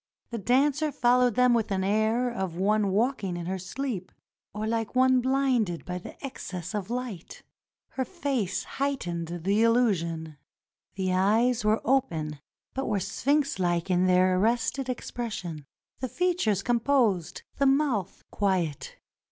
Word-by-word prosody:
The 230 - -3
dancer 280 +7 +2
followed 250 -2 +3
them 250 0 +5
with 230 -2 +1
the 195 - -1
air 220 +5 +2
of 190 -7 -3
one 205 +2 +2
walking 205 -3 0
in 170 - -5
her 190 +2 -3
sleep, 195 -1 -4 0.4
or 210 +1 -4
like 225 +1 -2
one 255 0 +4
blinded 255 -9 +1
by 180 0 -4 0.2
excess 190 - -6
of 205 -1 -3
light. 240 -8 -5 0.5
Her 265 - -2
face 265 - -2
heightened 175 -12 -3
the 180 +5 0
illu 230 -1 +4
sion. 160 -3 -5 0.6
The 185 -1 -1
eyes 220 +6 +2
were 215 +1 +2
open 160 - 0 0.3
but 270 - -3
were 210 -3 +1
sphinx 280 - 0
like 175 0 0
in 180 +1 +3
their 185 0 +4
arrested 240 +5 0
expression; 200 - -5 0.3
the 255 - -3
features 335 - 0
composed, 235 - +1 0.2
the 275 - +4
mouth 270 - +1
quiet. 185 -8 -1
220 Hz, 140 wpm, -27 LUFS, 185-255 Hz, 0.6 s, them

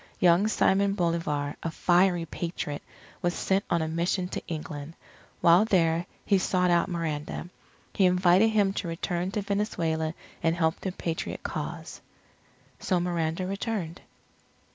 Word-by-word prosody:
Young 180 +3 +5
Simon 200 -2 +3
Bolivar, 165 -6 -1
a 165 - -2
fiery 175 +1 +3
Patriot, 165 -3 -4 0.4
was 175 0 0
sent 195 +1 +1
on 170 -2 +2
a - - -2
mission 175 +3 0
to - - -4
England. 155 -1 -6 0.5
While 170 +4 +6
there, 170 -5 +2 0.2
he 200 -2 +3
sought 180 -1 +2
out 170 +1 +3
Miranda. 165 -1 -3 0.4
He 190 - +4
invited 180 +3 +4
him 205 -3 +2
to 195 - -3
return 175 +2 -2
to 210 - -1
Venezuela 165 -6 -1 0.3
and 165 0 +2
help 160 -2 +1
the 190 - -3
Patriot 165 -2 -4
cause. - - -5 0.8
So 185 -2 +1
Miranda 175 0 -1
returned. 195 -3 -3
175 Hz, 140 wpm, -27 LUFS, 165-190 Hz, 0.8 s, While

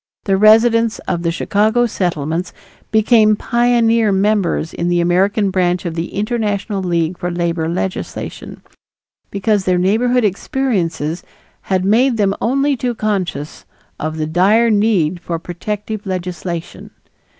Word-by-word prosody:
The 195 - +1
residents 225 +2 +4
in 175 -2 -1
the 170 - 0
Chicago 215 +7 +1
Settlements 175 -4 -2 0.4
became 220 0 +4
pioneer 230 -2 +2
members 195 -4 0
in 170 - -2
the 175 0 +1
American 190 +4 +1
branch 180 -1 0
of 170 - -3
the 165 +1 -5
International 205 -2 -2
League 170 -1 -1
for 180 - -2
Labor 170 -2 -1
Legislation, 185 +2 -5 0.7
because 200 0 0
their 185 -1 +2
neighborhood 225 +6 +2
experiences 185 - -1 0.5
had 190 -1 +1
made 235 +4 +3
them 200 -2 +2
only 275 +4 +1
too 245 -1 -2
conscious 185 -9 -3 0.4
of 155 +1 -3
the 155 - -1
dire 200 +9 +3
need 200 -6 +1
for 170 -2 -3
protective 210 +5 -5
legislation. 175 -2 -5
195 Hz, 130 wpm, -17 LUFS, 175-220 Hz, 0.7 s, residents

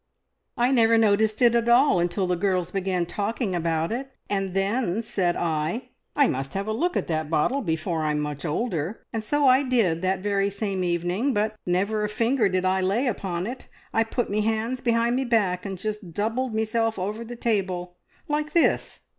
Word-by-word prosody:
"I 245 +2 +3
never 230 -3 +4
noticed 220 +1 +3
it 235 -1 +6
at 235 0 +2
all 245 -4 +5
until 175 +3 0
the 180 0 0
girls 180 -1 0
began 185 -2 -1
talking 205 +3 -2
about 165 -1 0
it, 265 +4 -3 0.2
and 195 -2 -1
then 205 +1 0
said 190 -6 0
I, 165 +9 -2 0.3
`I 285 -2 +6
must 135 +1 -3
have 195 +1 -2
a 215 - -2
look 350 +10 0
at - - -1
that 155 -2 -2
bottle 170 - +1
before 160 -3 -2
I'm 150 -1 0
much 150 -1 -4
older,' 170 +1 -2
and 225 -1 -2
so 290 +6 +1
I 255 +1 +6
did 225 -12 +1
that 185 0 0
very 200 -1 +1
same 200 -2 -2
evening, 175 +9 0
but 215 +1 0
never 200 +4 +1
a 210 - -1
finger 230 +1 +1
did 185 0 0
I 190 0 +2
lay 200 +8 +1
upon 190 -7 -2
it. 245 +4 -7 0.3
I 225 - +3
put 235 +2 -2
me 210 +1 0
hands 225 +4 -1
behind 235 0 +2
me 265 - +1
back 205 -7 +1
and 195 -1 -5
just 210 -2 -5
doubled 225 +4 -1
meself 220 0 0
over 210 +5 -3
the 240 +1 -8
table 185 -6 -2 0.3
like 300 +1 -2
this! 340 - +2
205 Hz, 195 wpm, -25 LUFS, 180-235 Hz, 0.3 s, it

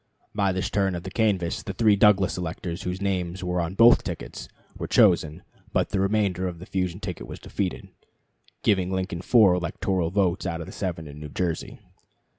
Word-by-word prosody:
By 100 -2 +1
this 95 0 -2
turn 95 -2 +1
of 85 - -5
the 95 - -7
canvass 95 -6 0
the 100 - -6
three 110 -1 +4
Douglas 100 -2 +4
electors 90 +1 -4
whose 90 +1 -4
names 95 -1 -2
were 90 0 0
on 85 +3 -4
both 115 +3 +6
tickets - - -6 0.3
were - - -5
chosen, 80 +3 +3 0.3
but - - +1
the 100 - -1
remainder 95 -2 +1
of 90 -2 -5
the 90 - -10
fusion 90 -2 -2
ticket 90 -5 -6
was - - -7
defeated, 95 -3 -4 0.8
giving 95 -2 +2
Lincoln 95 -2 -2
four 105 -2 +5
electoral 90 0 -1
votes 95 0 0
out 85 -1 -3
of 85 - -5
the - - -10
seven 85 -5 -4
in 75 0 -10
New 75 -1 -7
Jersey. 85 +2 -3
95 Hz, 190 wpm, -25 LUFS, 85-100 Hz, 0.8 s, both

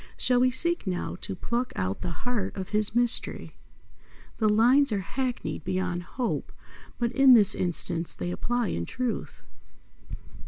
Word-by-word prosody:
Shall 250 -1 +3
we 255 +1 +4
seek 340 - 0
now 180 -1 -3
to - - -3
pluck 240 +7 -2
out 95 +1 -3
the - - -3 0.2
heart 245 -5 -2
of 190 -1 -5
his 210 +1 0
mystery? 240 0 +1 0.9
The 215 -2 +3
lines 245 +6 +4
are 200 -2 0
hackneyed 250 +6 -4
beyond 185 -1 -2
hope, 240 +7 -4 0.5
but 235 -1 -1
in 270 -2 +7
this 210 -4 +6
instance 175 -1 0
they 175 - -4
apply 240 +3 -1
in 85 - -3
truth. 250 -2 -4
225 Hz, 150 wpm, -27 LUFS, 185-250 Hz, 0.9 s, in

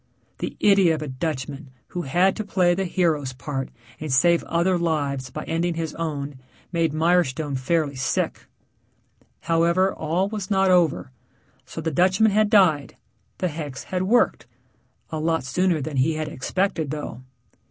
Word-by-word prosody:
The - - -4
idiot 195 -5 +5
of 155 - -6
a - - -5
Dutchman 140 0 -4 0.2
who 175 - -4
had 175 +6 +2
to 215 - -3
play 185 -3 +2
the 190 +2 -1
hero's 160 -7 0
part 135 0 -4 0.3
and 155 -2 -5
save 170 +6 +4
other 170 +3 +1
lives 140 -6 -1
by - - -6
ending 165 +1 -1
his 160 -2 -3
own 145 -4 -4 0.3
made 165 -3 +1
Mirestone 155 -3 +1
fairly 145 +2 0
sick. 130 - -2 0.9
However, 170 +3 +2
all 170 +5 -1
was 210 -2 -5
not 190 -2 +3
over. 160 - +2 0.6
So 160 - -6
the 160 0 -2
Dutchman 190 +7 +3
had 215 +1 +3
died; 175 - +3 0.4
the 185 - 0
hex 145 -4 -6
had 185 -1 -3
worked 220 +6 +2 0.6
a 160 - -3
lot 160 0 0
sooner 175 +5 +1
than 140 0 -4
he 150 +5 +2
had 155 0 -3
expected 160 +2 -1
though. 145 -5 -5
165 Hz, 155 wpm, -23 LUFS, 145-180 Hz, 0.9 s, idiot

